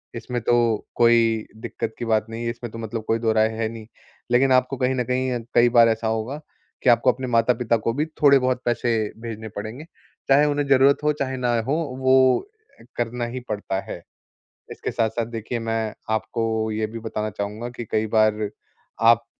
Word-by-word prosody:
इसमें 120 +1 -4
तो 120 - +2 0.4
कोई 115 -2 +3 0.2
दिक्कत 110 - -4
की 120 - -3
बात 110 -1 +1
नहीं 115 +1 -5
है, 115 - 0
इसमें 115 -1 -6
तो - - -8
मतलब 115 0 -5
कोई 115 - +1
दोहराय 110 -1 +3
है 115 -1 0
नहीं। 115 -1 -9 0.4
लेकिन 130 +2 +4
आपको 130 +1 +2
कहीं 130 +1 +1
न 125 - 0
कहीं, 125 0 -1
कई 120 0 +5
बार 115 -1 +6
ऐसा 110 0 -1
होगा 110 +6 -2 0.4
कि - - +4
आपको 120 +1 +5
अपने 130 +1 -6
माता-पिता 120 0 +2
को 115 +1 -2
भी 145 +5 0 0.2
थोड़े-बहुत 130 -3 +4
पैसे 120 0 0 0.3
भेजने 110 -1 -6
पड़ेंगे, 110 +9 -6 0.4
चाहे 140 +2 +6
उन्हें 145 -1 0
ज़रूरत 135 +1 +5
हो, 150 - +3
चाहे 130 -2 -3
ना 120 -1 +1
हो, 130 +6 -1 0.3
वो 130 0 +4 0.4
अ, - - -16
करना 120 0 -2
ही 120 +2 -5
पड़ता 105 -2 -2
है। - - -7 0.7
इसके - - -5
साथ-साथ 115 +1 -1
देखिए, 115 +1 -5
मैं 115 -1 -2 0.2
आपको 110 0 -1
ये 110 0 -1
भी 115 +1 -7
बताना 110 -1 -3
चाहूँगा 105 +3 -5
कि 120 - -5
कई 110 0 +1
बार 110 -1 +2 0.6
आप 115 0 +1
115 Hz, 185 wpm, -23 LUFS, 110-125 Hz, 0.7 s, बार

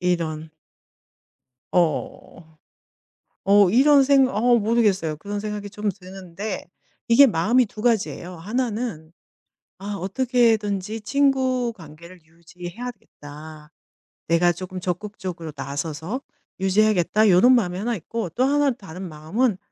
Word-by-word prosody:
이런. 160 -3 -2 1.2
어. 160 -1 -2 0.9
어 200 -2 +6
이런 275 +6 +5
생각 270 -1 +4
어 240 +3 +4
모르겠어요. 205 -7 +1
그런 205 +5 -5
생각이 210 -1 -5
좀 210 +1 -3
드는데 190 0 -7 0.4
이게 235 +4 +7
마음이 225 +6 +2
2 215 0 -10
가지예요. 215 -6 -1
하나는 215 -3 -4 0.7
'아 200 +1 -5
어떻게든지 220 -1 0
친구 260 -1 +1
관계를 170 +1 -13
유지해야겠다. 160 -3 -11 0.6
내가 170 +1 +3
쪼금 185 +2 -6
적극적으로 180 -3 -5
나서서 155 - -4 0.4
유지하겠다.' 210 +1 +3
요런 215 +8 +6
마음이 180 -7 0
하나 235 +4 -1
있고 210 +1 -5
또 245 - -2
하나 285 0 +2
다른 190 -5 -9
마음은 180 +8 -1
195 Hz, 260 characters per minute, -23 LUFS, 170-235 Hz, 1.2 s, 이게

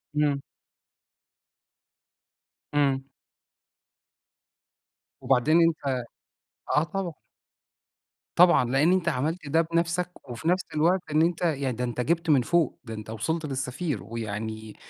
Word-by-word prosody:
إمم. 145 -2 +1 2.3
إمم. 135 -2 +1 2.1
وبعدين 135 +5 +3
أنت 135 -6 -2 0.7
آه 150 - +5
طبعَا. 175 +1 -3 1.2
طبعًا، 175 -7 +6
لإن 135 +8 +3
أنت 180 -2 +1
عملت 155 +3 -2
ده 160 +3 +3
بنفسك 170 +2 -1 0.2
وفي 120 +6 -5
نفس 185 +2 +2
الوقت 170 +4 +3
إن 155 +1 +3
أنت 170 +1 +1
يعني 140 -7 0
ده 125 - -2
أنت 125 0 -2
جبت 165 +4 0
من 140 -4 +5
فوق، 165 +3 +1
ده 115 -3 -7
أنت 110 0 -8
وصلت 155 +9 -2
للسفير 135 - -3
ويعني 110 0 -5
145 Hz, 115 wpm, -26 LUFS, 125-170 Hz, 2.3 s, طبعًا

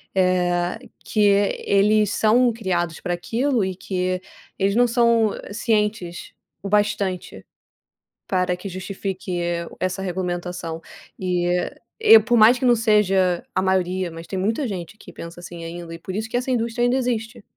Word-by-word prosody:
eh, 180 0 +1 0.3
que 215 - -1 0.4
eles 210 +1 +3
são 235 +3 +4
criados 175 -6 -2
para 175 - -2
aquilo 235 +7 0
e 190 -1 -3
que 185 0 -2 0.4
eles 195 +1 +1
não 245 +1 +4
são 235 -2 +3 0.2
cientes 210 -5 -1 0.3
o 200 - -4
bastante, 205 -3 -1 0.8
para 180 -1 +1
que 195 +2 -7
justifique 185 -1 -4 0.4
essa 185 +1 -2
regulamentação. 180 -2 -4 0.4
Eh, 180 -1 0 0.2
e 225 0 +8
por 235 +2 +1
mais 230 +3 +6
que - - -1
não 245 -1 +5
seja 195 -5 +2
a - - +2
maioria, 185 -1 0
mas 165 +1 -10
tem 190 - -3
muita 225 +8 0
gente 185 0 -6
que - - -13
pensa 170 +1 -9
assim 175 -1 -9
ainda 170 0 -7
e 165 - -8
por 185 - -7
isso 220 +2 -3
que 245 - -1
essa 255 +1 -2
indústria 235 0 0
ainda 250 +2 +2
existe. 230 -3 -3
195 Hz, 155 wpm, -22 LUFS, 180-225 Hz, 0.8 s, e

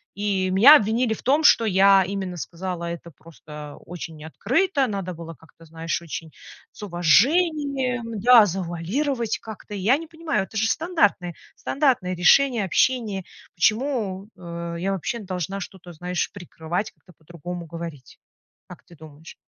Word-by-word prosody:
И 195 -2 -1
меня 260 +11 +9
обвинили 220 +2 0
в - - -9
том, 290 +4 +2
что 230 - +6
я 195 -1 +5
именно 190 -3 -4
сказала 175 +1 -5
это 170 0 -7
просто 150 -1 -12
очень 165 -3 -8
открыто, 270 - 0
надо 195 -4 -4
было 165 0 -9
как-то, 160 +1 -20
знаешь, 165 +1 -4
очень 165 -1 -7 0.4
с - - -15
уважением, 250 - +1
да, 240 -2 +7
завуалировать 200 - -2
как-то. 215 -1 -10
И 200 - -4
я 230 +9 +3
не 330 +1 -9
понимаю, 320 - -2
это - - -18
же 215 0 +1
стандартное 205 - 0 0.2
стандартное 255 -11 0
решение, 235 +6 +4
общение. 205 -1 0 0.3
Почему, 215 -1 0
э, 170 -1 -6
я 195 +2 -1
вообще 195 +5 -3
должна 190 -1 -4
что-то, 180 -2 -10
знаешь, 180 +1 -3
прикрывать, 175 0 -5
как-то 180 - -22
по-другому 175 +2 -8
говорить? 165 -5 -9 0.5
Как - - -12
ты 170 - -18
думаешь? 155 +1 -13
190 Hz, 145 wpm, -23 LUFS, 170-235 Hz, 0.5 s, меня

